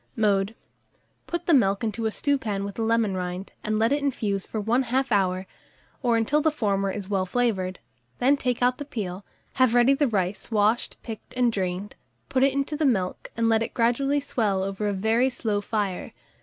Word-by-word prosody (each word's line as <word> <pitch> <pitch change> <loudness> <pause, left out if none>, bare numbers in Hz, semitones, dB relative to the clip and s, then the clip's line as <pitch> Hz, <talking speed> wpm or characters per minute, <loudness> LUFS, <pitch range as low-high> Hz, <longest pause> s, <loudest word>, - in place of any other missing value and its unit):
Mode. 205 -2 +1 0.7
Put 345 0 -3
the 340 - +3
milk 200 -6 +3
into 225 0 -1
a - - -1
stewpan 225 -8 -1
with 200 - -5
the 225 - -5
lemon 225 -3 +2
rind, 180 +1 -4
and 215 0 0
let 225 +3 +2
it 285 +1 +2
infuse 215 -8 -1
for 220 - -3
1/2 250 +4 +1
hour, 190 -2 +1 0.6
or 240 -3 +2
until 270 +7 +2
the 315 - +3
former 200 -8 0
is 195 0 -5
well 190 -2 0
flavoured; 190 -5 0 0.4
then 270 +3 +4
take 250 -3 -1
out 250 0 +2
the - - -3
peel; 200 -8 -5 0.4
have 250 -2 +5
ready 245 +3 +6
the 285 +1 +2
rice 195 -3 -2
washed, 215 +1 +1
picked, 225 0 -8
and 250 -1 +3
drained; 190 +1 -2 0.4
put 265 -1 +1
it 275 +1 +5
into 275 +2 -1
the 310 - -1
milk, 195 -10 0
and 230 0 +2
let 225 0 +3
it 230 - -4
gradually 275 +5 +2
swell 210 -8 0
over 195 +2 -2
a 205 - 0
very 220 +6 +2
slow 215 -5 -2
fire. 205 -3 -2
225 Hz, 195 wpm, -25 LUFS, 195-250 Hz, 0.7 s, ready